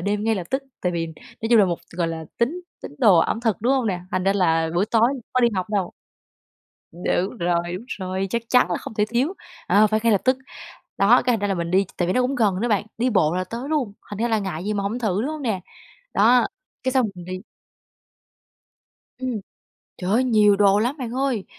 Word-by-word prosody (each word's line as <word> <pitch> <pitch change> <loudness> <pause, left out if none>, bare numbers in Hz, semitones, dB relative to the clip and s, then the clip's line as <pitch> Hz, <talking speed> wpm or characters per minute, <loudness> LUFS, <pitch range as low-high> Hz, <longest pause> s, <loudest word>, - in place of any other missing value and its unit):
đêm 205 +3 -1
ngay 225 0 +2
lập 185 -3 -3
tức, 265 +1 0 0.2
tại 180 -1 0
vì 165 -1 -1
nói 165 +7 -8
chung 235 - +7
là 205 - +7
một, 175 -2 -1 0.2
gọi 170 -2 0
là, 165 -1 -5
tín 290 +10 0 0.2
tín - - -8
đồ 205 -9 +6
ẩm 225 - +1
thực, 225 -4 +1
đúng 245 +4 +2
hông 260 -3 +1
nè? 185 -4 -1
Thành 185 0 -1
ra 195 - +3
là 165 -4 +2
buổi 185 +4 +2
tối 225 +1 +3 0.2
có 255 - +2
đi 240 - +5
học 185 -1 -1
đâu. 195 -4 0 1.0
Đúng 175 +2 -11 0.3
rồi, 170 -1 +1 0.2
đúng 230 - -12
rồi, 190 +1 -2
chắc 235 -1 -1
chắn 250 -7 +4
là 175 - +1
không - - -9
thể 210 -1 +2
thiếu, 260 - 0 0.3
ờ, 210 +2 +5
phải 215 +1 0
ngay 230 -2 +4
lập 200 - +3
tức. 255 0 +3 0.6
Đó, - - +5
cái 250 - +2
thành 225 - 0
ra 205 - 0
là 195 - +1
mình 170 -1 -3
đi 190 +2 +3
tại 175 - 0
vì 185 - +2
nó 255 - +3
cũng 255 +2 0
gần 205 -6 +1
nữa 240 - 0
bạn, 210 -1 +1
đi 250 +2 +1
bộ 170 -5 +2
là 185 - -1
tới 235 +8 -6
luôn, 275 -10 0 0.2
thành 205 - -6
ra 235 - +1
là 220 -1 +2
ngại 185 -4 -4
gì 210 +1 -1
mà 200 - -1
hổng 215 +5 -2
thử, 210 -3 0
đúng 275 - -2
hông 310 -2 -6
nè? 215 -7 -1 0.5
Đó, 240 +4 +5 0.4
cái 260 - 0
xong 255 -3 +3
mình 180 -1 -10
đi. 185 +1 -5 1.8
Ừm. 255 -5 -3 0.6
Trời 185 +1 -3
ơi, 250 +4 +3
nhiều 210 -4 +4
đồ 200 0 +4
lắm 245 +7 0
bạn 245 -3 -4
ơi, 260 -6 -1
210 Hz, 240 wpm, -23 LUFS, 185-240 Hz, 1.8 s, chung